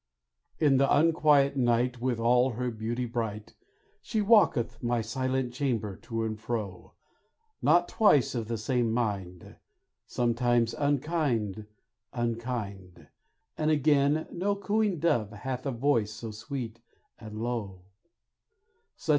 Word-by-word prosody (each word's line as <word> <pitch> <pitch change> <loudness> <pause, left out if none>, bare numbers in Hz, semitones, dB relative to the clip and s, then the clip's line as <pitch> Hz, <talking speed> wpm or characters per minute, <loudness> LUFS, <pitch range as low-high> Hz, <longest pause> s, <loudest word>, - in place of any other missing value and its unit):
In 145 -4 +4
the 135 +1 +3
unquiet 150 -3 +4
night, 120 -1 +1
With 125 -2 -1
all 125 +2 +3
her 125 +2 -2
beauty 115 +3 -3
bright, 110 -3 -4 0.5
She 220 - -2
walketh 205 - +3
my 120 0 0
silent 130 +2 -2
chamber 120 -7 -2
to 115 -1 -4
and 110 -1 -3
fro; 110 -5 -5 0.7
Not 175 +3 +4
twice 150 - +3
of 115 -4 -3
the 115 0 -2
same 115 +1 0
mind, 100 -7 -3 0.5
Sometimes 120 -1 +1
unkind 140 - -1 0.5
unkind, 115 -6 -4 0.5
And 155 0 0
again 145 0 +3
no 200 +3 -1
cooing 205 -1 0
dove 120 -10 +1
hath 130 +5 -5
a - - 0
voice 115 -4 +1
so 110 +2 -7
sweet 115 +1 -6 0.4
and 110 -2 -9
low. 110 -6 -4
120 Hz, 120 wpm, -28 LUFS, 110-140 Hz, 0.7 s, In